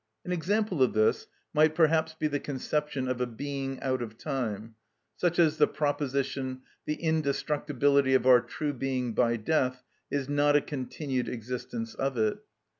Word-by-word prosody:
An 180 - -4
example 185 0 0
of 130 - +4
this 110 0 +2 0.3
might 155 +1 +4
perhaps 160 -1 +3
be 155 - 0
the 145 -1 -1
conception 140 0 -2
of 130 -1 -2
a 125 - +1
being 135 +2 -4
out 130 -2 0
of 110 -2 -6
time; 115 -7 -3 0.4
such 175 -1 0
as 160 -3 +4
the - - +5
proposition: 140 -3 -2 0.3
the 150 - 0
indestructibility 145 -3 +1
of 130 - +2
our 125 -2 +7
true 150 +3 -3
being 130 -2 -2
by 120 +1 +2
death 125 +1 0 0.3
is 140 -2 -1
not 145 0 +3
a 145 - +5
continued 135 -2 -3
existence 125 - -5
of 135 -2 -2
it. 110 -1 +1
140 Hz, 160 wpm, -29 LUFS, 125-150 Hz, 0.4 s, our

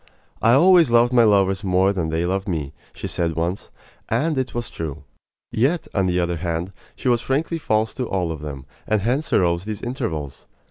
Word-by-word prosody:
"I 115 - +5
always 170 +2 +6
loved 120 +1 +4
my 120 -1 +6
lovers 100 -2 +3
more 95 +1 +2
than 85 -5 -2
they 80 +2 0
loved 95 +2 -1
me," 75 -6 -3 0.2
she - - -8
said 85 -2 -1
once, 85 +4 -2 0.4
and 150 +8 +1
it 130 -2 -2
was 120 -2 -3
true. 80 -2 -6 0.5
Yet, 145 +9 +1
on 95 -2 +1
the 90 0 +1
other 85 -1 -1
hand, 85 +2 -3 0.2
she - - -5
was 120 -2 +3
frankly 155 +6 -1
false 110 -5 0
to 125 - -4
all 90 -3 -1
of 80 - -5
them, 70 -3 -7 0.2
and 110 -1 +1
hence 130 +9 -1
arose 85 -1 +2
these 105 -2 -5
intervals. 80 - -4
95 Hz, 195 wpm, -22 LUFS, 85-120 Hz, 0.5 s, always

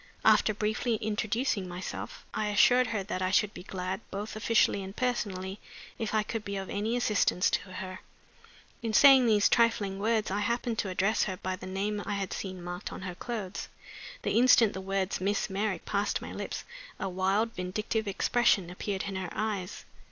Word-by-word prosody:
After - - +5
briefly 220 +3 0
introducing 215 0 -1
myself, 180 +1 -6
I 215 -1 -1
assured 245 +4 +5
her 215 -3 -2
that 185 -1 -4
I 185 - +1
should 205 +2 +2
be - - -8
glad, 185 0 -4
both 205 +2 -5
officially 215 -2 +2
and 195 +1 -7
personally, 200 -6 -2 0.4
if 220 -1 -2
I 215 - +3
could 220 0 -4
be 200 -1 -4
of 195 -1 -4
any 220 +4 0
assistance 210 -5 +2
to 185 - -2
her. 185 0 -6 0.8
In 225 -1 -2
saying 270 -1 +8
these 210 -2 +5
trifling 220 -5 +2
words 215 -1 +1
I 200 - 0
happened 235 +1 -1
to 195 - -1
address 195 +4 +1
her 190 -2 -3
by 185 0 -3
the 185 - -9
name 205 +2 -2
I 205 - -2
had 195 -2 -3
seen 185 -2 -5
marked 175 +2 -5
on - - -7
her 180 -1 -4
clothes. 205 -1 -5 0.5
The - - 0
instant 240 -3 +6
the 190 - -5
words 195 0 -1
"Miss 200 +1 0
Merrick" 200 0 -1
passed 200 +1 0
my - - -8
lips - - -5 0.4
a 195 - -2
wild, 195 +5 +1
vindictive 210 +4 -2
expression 200 -2 +2
appeared 190 +1 -3
in 200 -1 -4
her 185 -1 -4
eyes. 210 -3 -3
205 Hz, 185 wpm, -29 LUFS, 190-220 Hz, 0.8 s, saying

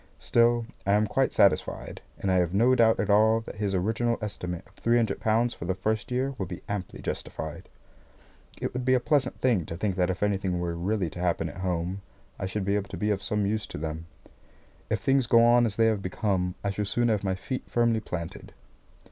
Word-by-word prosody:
Still, 120 0 +3 0.2
I 100 - +2
am 105 +1 +4
quite 130 +6 +1
satisfied, 100 - +1 0.2
and 95 - -1
I 95 - +3
have 90 0 +1
no 120 +5 +5
doubt 115 -3 +4
at 105 -1 +1
all 110 +2 +5
that 110 - -9
his 100 -2 -1
original 115 +5 0
estimate 90 -5 -5
of 100 - -23
three 115 +3 +1
hundred 110 -4 0
pounds 115 +2 +2
for - - -8
the 95 +1 -1
first 110 +3 -2
year 130 +2 -1
will 95 - -2
be 90 -1 -8
amply 100 -3 -5
justified. - - -5 0.9
It - - -3
would 125 0 -3
be 130 +1 +4
a - - +3
pleasant 135 0 +1
thing 120 -9 +2
to 85 - -5
think 100 0 -1
that 90 0 +2
if 95 +2 -2
anything 95 -3 0
were 85 -1 -2
really 90 0 -1
to - - -8
happen 85 -2 0
at 75 - -10
home, 90 +1 -2 0.4
I 95 - -2
should 95 0 -3
be 100 - +1
able 100 -1 -2
to 95 - -6
be 105 +4 0
of 100 -1 -1
some 105 0 0
use 105 +1 -1
to - - -7
them. 80 +2 -5 0.8
If - - 0
things 135 -2 +2
go 115 +1 +6
on 120 0 +5
as 105 - -4
they 115 - +3
have 110 -3 +2
begun, 95 -2 -1
I 100 - 0
shall 105 +1 -2
soon 120 +4 +1
have 105 -2 +1
my 95 -1 0
feet 130 +7 -5
firmly 115 -1 +2
planted. 85 -5 -6
105 Hz, 225 wpm, -27 LUFS, 95-115 Hz, 0.9 s, go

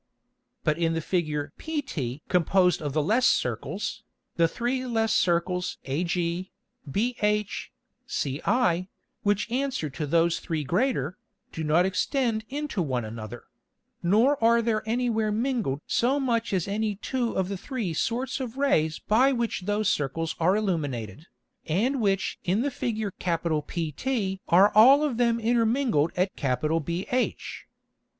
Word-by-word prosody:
But 155 +2 +1
in 165 -1 +1
the - - 0
Figure 155 -4 -2
pt 165 - -4
composed 180 0 +3
of 145 -3 -3
the 155 0 +1
less 230 +10 +3
Circles, - - -1 0.3
the 165 -1 +4
three 245 +7 -2
less 225 -2 +1
Circles 180 +1 +1
ag, 145 +7 -1 0.8
bh, 210 - +1 0.6
ci, 175 - 0 0.3
which 205 +2 0
answer 255 - -1
to 150 +2 -4
those 165 +2 +2
three 160 -3 -3
greater, 180 - 0 0.3
do 160 - -5
not 160 +4 +3
extend 225 +3 0
into 285 -7 -2
one 130 -7 -1
another; 110 +1 -7 0.6
nor 225 +9 +3
are 235 0 +5
there 220 -2 +1
any 245 +2 0
where 220 -1 0
mingled 225 - -1
so 260 +4 +1
much 235 -4 0
as 185 -3 0
any 210 +1 -1
two 240 +3 -2
of 190 -1 0
the 200 - -3
three 215 - -4
sorts 240 - -1
of 255 -1 -5
Rays 160 - +2
by 250 +6 +3
which 235 -7 -2
those 205 0 +1
Circles 155 +2 -1
are 180 +4 +3
illuminated, 150 - -2 0.4
and 235 - +1
which 195 -2 0
in 190 +5 +1
the 285 - -1
Figure 220 -4 -2
PT 170 - -2
are 190 +4 +6
all 265 +7 +7
of 280 -6 -1
them 235 -1 +2
intermingled 230 - +2
at 185 +1 0
BH. 165 - -1
195 Hz, 140 wpm, -26 LUFS, 165-235 Hz, 0.8 s, all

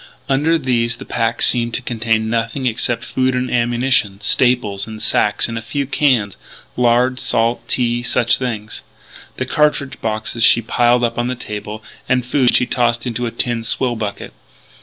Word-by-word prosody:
Under 150 +5 +2
these 120 -5 0
the - - -11
pack 115 0 -1
seemed 120 -1 +2
to - - -3
contain 110 -1 -1
nothing 115 +4 -2
except 120 0 -1
food 130 0 0
and 125 0 -2
ammunition; 120 -4 +1
staples 110 -5 +1
in 110 -1 -8
sacks 105 -1 +2
and 115 -1 -4
a - - -9
few 140 +5 -3
cans 130 -7 +1 0.4
lard, 125 +1 +2
salt, 115 0 0
tea 120 -1 0
such 120 -1 +1
things. 110 -5 -4 0.6
The - - -2
cartridge 150 -2 0
boxes 110 +1 -2
she 115 0 +5
piled 120 +2 +2
up 115 0 -1
on 120 - 0
the 125 - -2
table; 105 -2 -7 0.2
the 130 - +2
food 125 0 +2
she 125 - +4
tossed 120 -2 0
into 120 0 -2
a - - -4
tin 115 0 -1
swill 120 +1 -1
bucket. 105 -3 -5
120 Hz, 170 wpm, -18 LUFS, 115-125 Hz, 0.6 s, she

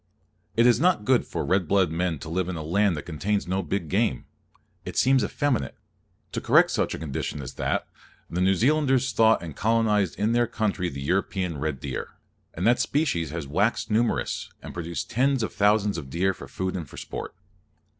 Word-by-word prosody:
It 115 - +5
is 120 -2 +5
not 170 - +2
good 130 +1 +3
for - - -3
red 95 -2 +1
blooded 95 -3 +3
men 85 -1 -1
to 80 - -8
live 90 +2 -1
in 90 - -3
a 80 - -5
land 90 +2 +2
that 75 - -6
contains 100 +6 -1
no 95 +2 0
big 85 0 -3
game. 100 - 0 0.6
It - - -7
seems 130 -2 +4
effeminate. 140 +3 -1 0.6
To - - -3
correct - - +5
such - - 0
a - - -6
condition 75 -1 -4
as 70 -1 -7
that, - - -1 0.4
the 90 - -2
New 95 +1 +4
Zealanders 135 - +2
took - - -4
thought 110 -4 +4
and 80 -4 -7
colonized 105 -4 +1
in 105 +2 +1
their 120 0 +2
country 100 -6 -1
the 70 -2 -6
European 90 -1 -1
red 75 -2 -2
deer; 70 -3 -5 0.4
and 90 - -2
that 120 +2 +4
species 120 - 0
has 80 0 -5
waxed 100 - 0
numerous, 115 +2 0
and - - -8
produced 85 0 -5
tens 130 +1 +2
of - - -3
thousands 105 -2 +2
of 70 -5 -9
deer, 95 +7 +1
for - - -11
food 95 0 -3
and 80 -7 -5
for - - -12
sport. - - -6
95 Hz, 200 wpm, -26 LUFS, 85-115 Hz, 0.6 s, It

